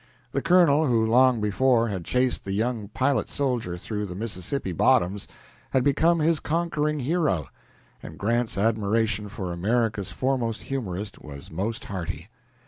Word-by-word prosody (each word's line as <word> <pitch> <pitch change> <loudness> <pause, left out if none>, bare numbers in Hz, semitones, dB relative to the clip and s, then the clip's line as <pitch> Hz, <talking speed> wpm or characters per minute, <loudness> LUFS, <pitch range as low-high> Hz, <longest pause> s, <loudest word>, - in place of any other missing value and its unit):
The 140 - -1
colonel 160 -4 +4
who 115 -3 +3
long 125 +1 +4
before 115 +2 +2
had 95 -5 -4
chased 125 0 0
the 95 - -4
young 110 0 -1
pilot 130 +6 0
soldier 120 -11 -2
through 105 +3 -4
the 90 - -7
Mississippi 100 +1 -4
bottoms 90 +3 +2 0.4
had 130 - +2
become 160 +5 +3
his 160 0 +2
conquering 150 -2 -1
hero, 135 - 0 0.5
and 80 - -10
Grant's 115 +2 0
admiration 105 0 +1
for 95 -4 -5
America's 105 +2 0
foremost 125 -4 -1
humorist 105 -7 -5
was 70 -2 -10
most 105 +9 -3
hearty. 85 -2 -5
115 Hz, 140 wpm, -25 LUFS, 100-135 Hz, 0.5 s, colonel